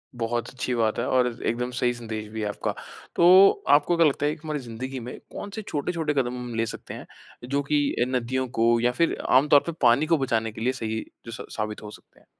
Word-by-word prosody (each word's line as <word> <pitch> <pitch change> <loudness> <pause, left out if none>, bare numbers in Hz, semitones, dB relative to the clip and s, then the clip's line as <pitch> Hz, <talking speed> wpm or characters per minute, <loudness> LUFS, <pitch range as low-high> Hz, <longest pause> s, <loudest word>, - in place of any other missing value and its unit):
बहुत 120 0 -2
अच्छी 125 0 -3
बात 110 -2 +1
है 120 - -1
और 125 -1 +3 0.2
एकदम 125 +2 -1
सही 125 -1 +2
संदेश 110 -3 -6
भी 110 0 -5
है 105 - -1
आपका। 105 - -3 0.4
तो 185 +3 +8 0.2
आपको 150 +4 +4
क्या 165 - +5
लगता 145 0 -1
है 150 - +1
कि - - -18
हमारी 155 -2 -3
ज़िंदगी 130 +2 -6
में 120 +1 -8
कौन-से 205 +2 -6
छोटे-छोटे 155 +1 -2
कदम 125 -3 -1
हम 125 -1 -6
ले 115 0 +1
सकते - - -7
हैं, - - -9 0.4
जो 140 +1 +1
कि 145 +1 +1 0.2
अ, - - +4
नदियों 130 +1 -1
को 115 +1 +4
या 120 +1 +2
फिर 165 +7 0
आम 130 +3 +5
तौर 145 - +8
पर - - 0
पानी 125 +4 +4
को 165 +1 +3
बचाने 115 -5 -1
के 110 - -10
लिए 125 +3 +1
सही 110 -3 -3 0.2
जो 115 - -7
स 115 - -7
साबित 105 0 -4
हो 105 - -8
सकते - - -17
हैं? - - -27
125 Hz, 235 wpm, -25 LUFS, 115-145 Hz, 0.4 s, तो